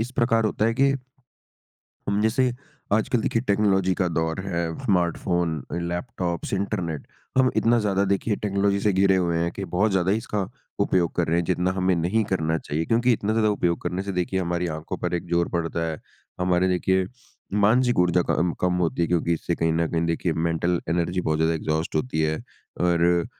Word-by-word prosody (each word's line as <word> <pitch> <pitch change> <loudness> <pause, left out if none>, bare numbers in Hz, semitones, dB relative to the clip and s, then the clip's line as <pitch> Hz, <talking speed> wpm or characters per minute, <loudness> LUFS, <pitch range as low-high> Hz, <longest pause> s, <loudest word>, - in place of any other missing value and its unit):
इस 115 +2 -2
प्रकार 115 -2 +2
होता 110 0 0
है 115 - +2
कि 140 0 +5 1.2
हुँ, 100 +1 +1
जैसे 125 +3 +2 0.4
आजकल 110 +3 +2
देखिए 115 +1 0
टेक्नोलॉज़ी 100 -4 +2
का 90 - 0
दौर 80 +2 -1
है, 85 -3 -1 0.2
स्मार्टफ़ोन, 85 -4 0
लैपटॉप्स, 85 +1 -3
इंटरनेट। 90 -6 -3 0.3
हम 130 -1 +5
इतना 120 +1 +3
ज़्यादा 100 -1 +1
देखिए 100 +2 +1
टेक्नोलॉज़ी 100 -1 +1
से 105 0 +2
घिरे 95 0 +4
हुए 85 -2 +1
हैं 85 +1 0
कि 100 - -5
बहुत 105 +3 +3
ज़्यादा 95 -1 +1
ही 100 - +3
इसका 105 -3 -3 0.3
उपयोग 85 -3 +1
कर 85 - +1
रहे 80 - +1
हैं 85 - +1
जितना 90 +1 0
हमें 95 0 +2
नहीं 90 +7 +1
करना 80 -5 0
चाहिए 75 +3 -3
क्योंकि 120 +6 +3
इतना 110 -1 0
ज़्यादा 110 -1 +2
उपयोग 85 -4 0
करने 90 +2 -2
से 100 0 -4
देखिए 90 +1 -1
हमारी 85 0 -1
आँखों 80 +4 -5
पर 90 0 -2
एक 85 - -3
ज़ोर 85 0 +2
पड़ता 85 -1 -2
है। 80 - -5 0.4
हमारे 90 0 +2
देखिए 95 +1 +1 0.6
मानसिक 120 +2 +3
ऊर्जा 90 0 +3
कम 85 0 +1
कम 90 0 +2
होती 85 - -2
है - - +2
क्योंकि 85 -1 +1
इससे 85 +1 -1
कहीं 80 -1 +1
न 85 +1 +1
कहीं 85 0 0
देखिए 85 +1 0
मेंटल 85 +2 0
एनर्जी 85 +2 0
बहुत 80 -3 0
ज़्यादा 80 +1 +2
एग्ज़ॉस्ट 80 +1 -2
होती 75 +1 -1
है। 80 0 +1 0.4
और 85 0 +3
90 Hz, 190 wpm, -24 LUFS, 85-100 Hz, 1.2 s, कि